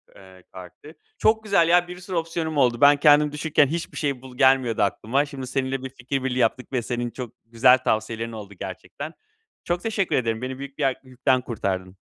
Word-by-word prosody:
eee, 95 -1 -16
kartı. 95 - -12 0.2
Çok 220 0 +2
güzel 200 -6 +3
ya, 175 0 +4
bir 180 0 -9
sürü 185 0 -6
opsiyonum 165 -1 -2
oldu. 125 -4 +2
Ben 145 0 +7
kendim 150 +1 +5
düşünürken 150 -1 +2
hiçbir 165 +4 -4
şey 140 -4 -2
bul 130 -1 -12
gelmiyordu 130 -4 +3
aklıma. 115 +7 +1
Şimdi 135 -3 -7
seninle 135 0 -2
bir 130 - -5
fikir 130 +1 -4
birliği 130 -1 -1
yaptık 125 +2 0
ve 125 - +1
senin 120 +1 -3
çok 120 -1 -7
güzel 120 +3 +5
tavsiyelerin 115 -1 -2
oldu 105 -3 -9
gerçekten. 100 - -7 0.5
Çok 175 0 -2
teşekkür 215 -4 0
ederim. 115 -3 0
Beni 130 +1 -5
büyük 140 0 -8
bir - - -2
yak 130 -1 +1
yükten 130 0 0
kurtardın. 95 -6 -4
130 Hz, 195 wpm, -24 LUFS, 115-150 Hz, 0.5 s, Ben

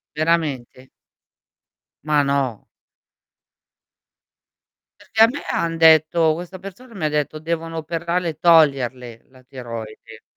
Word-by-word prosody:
Veramente? 150 -6 -2 1.1
Ma 150 -1 +2
no. 140 -5 -2 2.4
Perché 220 0 +1
a - - +9
me 280 +5 -6
han 165 -1 -2
detto 160 0 +4
questa 180 +2 -8
persona 200 +6 -12
m'ha 160 -6 -2
detto: 150 0 -2
"Devono 165 +1 -4
operare 170 +2 -3
e 155 - -11
toglierle 130 -8 +2
la 130 -1 -20
tiroide". 115 -3 -10
155 Hz, 105 wpm, -20 LUFS, 130-170 Hz, 2.4 s, a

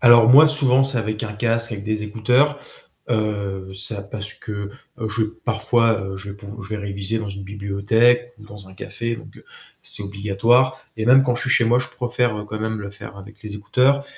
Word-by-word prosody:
Alors 120 -2 +7
moi, 140 +5 +9
souvent, 135 -4 +3
c'est 135 -2 +1
avec 110 0 -3
un 105 - -4
casque, 115 +2 0
avec 100 -2 -6
des 110 0 -2
écouteurs, 125 +7 +2 0.5
heu, 100 -4 -2
ça 100 +1 -3
parce 105 +1 -6
que 100 -1 -6 0.4
je 110 +1 -1 0.2
parfois, 110 -3 +1
je 100 +1 -8
vais 100 - -9
pou 105 +2 -10
je 100 - -9
vais 110 - -2
réviser 100 +1 -3
dans 110 -2 -5
une 100 0 -7
bibliothèque 105 +5 +1
ou 105 - -14
dans 100 -2 -11
un 95 - -14
café, 115 +4 -4
donc - - -13
heu, - - -16 0.4
c'est 105 - -2
obligatoire 105 +7 +2 0.2
et 110 - -2
même 130 +2 +7
quand 125 -2 +1
je - - -3
suis 130 - -2
chez 120 - +4
moi, 120 +2 +3
je 130 - -2
préfère 120 -3 -1
quand 110 0 -5
même 110 0 -2
le 100 -1 -6
faire 100 0 -11
avec 100 +2 -14
les 105 -2 -7
écouteurs 130 +7 +2
110 Hz, 205 wpm, -21 LUFS, 100-120 Hz, 0.5 s, moi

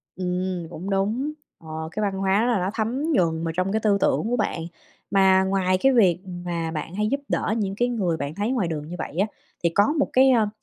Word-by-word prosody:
Ừm, 180 -1 -2
cũng 185 +5 -6
đúng, 215 +9 0 0.3
ờ, 160 0 -6
cái 215 - -3
văn 200 -1 0
hóa 195 +4 +2
là 240 -4 +2
nó 185 - -1
thấm 255 +9 -1
nhuần 165 - +1
mà 165 - -1
trong 185 +1 +1
cái 220 - +1
tư 205 -2 +4
tưởng - - +2
của 245 - +1
bạn. 210 - -1 0.5
Mà 190 -1 +5
ngoài 190 -1 +1
cái 270 - +5
việc 185 -8 +4 0.3
mà 165 -2 -2
bạn 165 +3 -5
hay 210 +1 0
giúp 275 +5 0
đỡ - - 0
những 195 -2 -2
cái 240 +4 +1
người 190 -9 -1
bạn 140 +1 -4
thấy 210 +4 -1
ngoài 235 -9 0
đường 150 -2 -4
như 175 - -6
vậy 160 - -5
á, 195 +3 +2 0.4
thì 170 - +4
có 205 - +3
một - - +3
cái, 265 +1 +6
a, 225 -5 +3
195 Hz, 235 wpm, -24 LUFS, 175-220 Hz, 0.5 s, cái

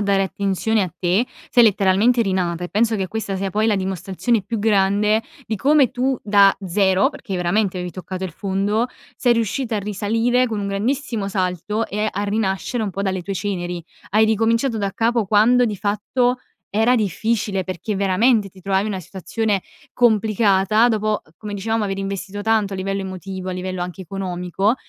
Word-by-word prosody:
dare 200 -1 +2
attenzione 200 +3 0
a 185 - -3
te, 185 +7 +1 0.2
sei 245 - +6
letteralmente 210 +3 +4
rinata 180 -3 -1
e - - -5
penso 225 +1 +2
che 190 -2 -1
questa 205 -2 -3
sia 195 0 -2
poi 215 +3 +1
la 215 -2 +2
dimostrazione 195 +4 -1
più 225 +4 -3
grande 210 +1 +2 0.2
di 220 - -2
come 280 +3 +4
tu 260 0 0
da 200 -1 +5
zero, 190 +1 +3
perché 190 - -6
veramente 190 +2 0
avevi 180 0 -4
toccato 185 +1 -6
il 185 - -5
fondo, 205 +3 0 0.3
sei 240 -2 +2
riuscita 230 +1 -1
a - - 0
risalire 225 +5 +1
con 220 -3 -3
un 200 - -3
grandissimo 225 +1 -1
salto, 195 +3 -1
e 210 +2 -1
a 205 - -3
rinascere 205 +3 -1
un 210 - -2
po' 195 +1 -4
dalle 190 -2 -1
tue 195 +2 -4
ceneri. 175 -2 -3 0.3
Hai 215 +2 +4
ricominciato 225 +2 +1
daccapo, 225 +3 0
quando 220 +5 +4
di 210 -2 -2
fatto 225 +5 0 0.3
era 225 +4 +3
difficile 210 -1 0
perché 185 +3 -4
veramente 200 +3 +2
ti 190 0 -17
trovavi 195 +1 0
in - - -2
una 190 - -4
situazione 195 +3 -2 0.3
complicata 215 -2 +3
dopo, 215 -2 0
uhm, 155 - -25
come 210 -1 -6
dicevamo 220 +2 -1
aver 195 -1 -2
investito 195 +1 -4
tanto 215 -2 +1
al 190 - -4
livello 195 +1 -2
emotivo, 190 0 -6
a - - -2
livello 185 0 -4
anche 180 +2 -6
economico, 190 +2 -1
200 Hz, 180 wpm, -21 LUFS, 190-225 Hz, 0.3 s, sei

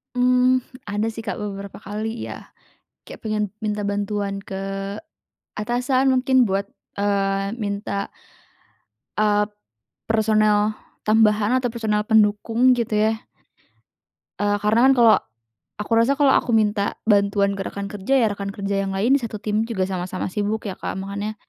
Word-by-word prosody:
Mmm, 250 +1 +4 0.2
ada 210 +2 -2
sih, 225 0 -5
Kak, 215 - -4
beberapa 200 -1 -6
kali 215 +3 -5
ya, - - -10 0.5
kek - - -11
pengen 210 -2 -2
minta 210 -1 -2
bantuan 200 -1 -2
ke 195 0 -5 0.9
atasan 250 +4 +1
mungkin 260 -1 +3
buat, 195 +1 0 0.3
eee, 195 -1 0
minta, 200 -1 -3 1.1
eee, 210 -1 +2 0.6
personel 215 -1 +2 0.3
tambahan 215 +1 +4
atau 245 -2 -2
personel 215 -3 -1
pendukung 220 +3 +3
gitu 230 -2 -1
ya. 220 +1 -3 1.2
Eee, 205 0 +1
karena 215 +2 +3
kan 270 - +6
kalau 230 -3 +7 0.7
aku 210 - -8
rasa 230 +4 +4
kalau 280 -1 +4
aku - - +1
minta 210 -2 +1
bantuan 200 -1 +3
ke 195 - -3
rekan 200 0 -5
kerja 205 +5 -2
ya, 225 - +4
rekan 200 -1 -4
kerja 200 0 -2
yang 195 - -3
lain 235 +8 +3
satu 220 -4 -6
tim 215 +1 0
juga 215 -5 -1
sama-sama 185 0 -3
sibuk 210 +2 -2
ya, 190 - -5
Kak, - - -4
makannya, 200 +2 -4
210 Hz, 140 wpm, -22 LUFS, 200-225 Hz, 1.2 s, kalau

